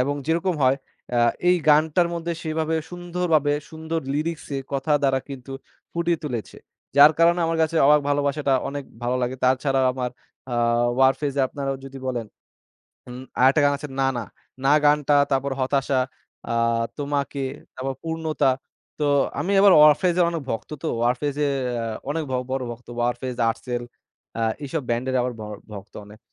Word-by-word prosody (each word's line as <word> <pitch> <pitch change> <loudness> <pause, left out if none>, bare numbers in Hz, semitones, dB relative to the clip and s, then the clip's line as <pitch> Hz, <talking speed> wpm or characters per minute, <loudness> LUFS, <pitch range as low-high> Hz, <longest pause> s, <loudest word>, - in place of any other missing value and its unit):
এবং 140 +3 +1
যেরকম 170 +3 +1
হয় 130 +1 +4 0.4
এ্যাঁ 120 -1 +4 0.2
এই 180 - +5
গানটার 155 +3 +4
মধ্যে 170 0 -3
সেভাবে 160 0 -1 0.2
সুন্দরভাবে 175 -4 0 0.2
সুন্দর 160 +1 -3
Lyrics 155 +3 -2
এ - - -1
কথা 140 +2 0
দ্বারা 135 -1 +3
কিন্তু 135 -1 -8 0.4
ফুটিয়ে 170 0 0
তুলেছে। 120 -6 -5 0.4
যার 145 +2 +9
কারণে 170 +1 +4
আমার 165 0 -1
কাছে 160 +1 0
অবাক 150 +1 +6
ভালোবাসাটা 145 -1 +1
অনেক 140 0 -5 0.2
ভালো 125 +1 0
লাগে। 125 +1 -1
তার 130 +1 +4
ছাড়াও 135 -2 +2
আমার 125 -1 -3 0.4
আ - - 0 0.5
Warfaze 135 +1 +2
আপনারা 135 0 -4
যদি 135 0 -9
বলেন 120 -3 -2 0.8
উম 125 +1 -8 0.2
আরেকটা 135 +4 +5
গান 145 - +5
আছে 150 - -7
না, 135 - +3
না। 115 - -3 0.4
না 135 - +5
গানটা 145 0 +4 0.2
তারপর 135 +1 +1
হতাশা, 135 0 +1 0.5
আ - - 0 0.5
তোমাকে, 140 -1 -2 0.3
তারপর 135 +1 -3
পূর্ণতা। 160 -4 0 0.5
তো 150 - +1 0.3
আমি 195 - -1
আবার 200 -2 +7
Warfaze 160 +4 +5
অনেক 165 -2 -3
ভক্ত 115 - -5
তো। 160 - -1 0.2
Warfaze 135 +4 0
এ্যাঁ 125 -5 -2 0.2
অনেক 160 +1 -1
ব - - -2 0.2
বড় 135 -1 -1
ভক্ত। 120 +1 -11
Warfaze, 125 +1 -2
Artcell 120 +1 -3 0.6
আ - - 0 0.2
এইসব 145 +3 -2
Band 120 +1 0
এর 130 - -1
আবার 125 0 -2
ভ - - -6 0.3
ভক্ত 100 0 -10
অনেক। 105 +1 -15
140 Hz, 160 wpm, -23 LUFS, 130-160 Hz, 0.8 s, যার